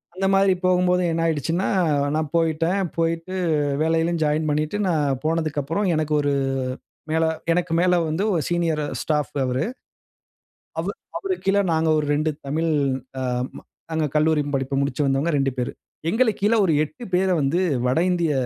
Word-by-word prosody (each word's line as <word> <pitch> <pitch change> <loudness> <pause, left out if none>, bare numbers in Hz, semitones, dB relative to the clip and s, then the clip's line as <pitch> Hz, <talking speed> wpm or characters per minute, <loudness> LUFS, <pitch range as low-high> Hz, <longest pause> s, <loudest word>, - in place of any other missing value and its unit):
அந்த 195 - -1
மாதிரி 195 -1 +4
போகும்போது 180 0 +3
என்ன 165 0 -1
ஆயிடுச்சுன்னா, 165 +3 0 0.5
நான் 155 -2 -1
போய்ட்டேன். 165 +3 +1 0.2
போய்ட்டு 165 +2 -1 0.5
வேலையிலும் 165 +1 +1
ஜாயின் 155 +1 +1
பண்ணிட்டு 155 +6 0
நான் 145 -6 +1
போனதுக்கு 155 -2 0
அப்புறம் 165 +9 -1
எனக்கு 155 -1 -1
ஒரு 145 0 +1 0.8
மேல 160 +1 +2 0.3
எனக்கு 175 -1 0
மேல 180 0 +3 0.2
வந்து 165 +6 -1
ஒரு 165 - +1
சீனியரு 165 -3 0 0.2
ஸ்டாஃப் 150 -2 -1
அவரு. 125 +1 0 1.2
அவு - - -1 0.3
அவுருக் 385 -2 -3
கீழ 195 +1 +3
நாங்க 160 0 +1
ஒரு 150 - -1
2 155 +1 +1 0.2
தமிழ் 160 +3 0 0.5
அ - - -2 0.3
ம - - -8 0.3
நாங்க 160 -1 0
கல்லூரி 155 -1 +3
படிப்ப 135 +1 -3
முடிச்சு 140 +1 0
வந்தவங்க 135 +5 +1
2 135 -1 +1
பேரு. 125 - -1 0.4
எங்களுக்கு 225 -3 +1
கீழ 215 +3 +4
ஒரு 165 - +2
8 240 - -10
பேரை 185 0 +3
வந்து 140 +6 +1 0.3
வட 130 +5 +2
இந்திய 170 -4 +1
160 Hz, 155 wpm, -23 LUFS, 150-180 Hz, 1.2 s, மாதிரி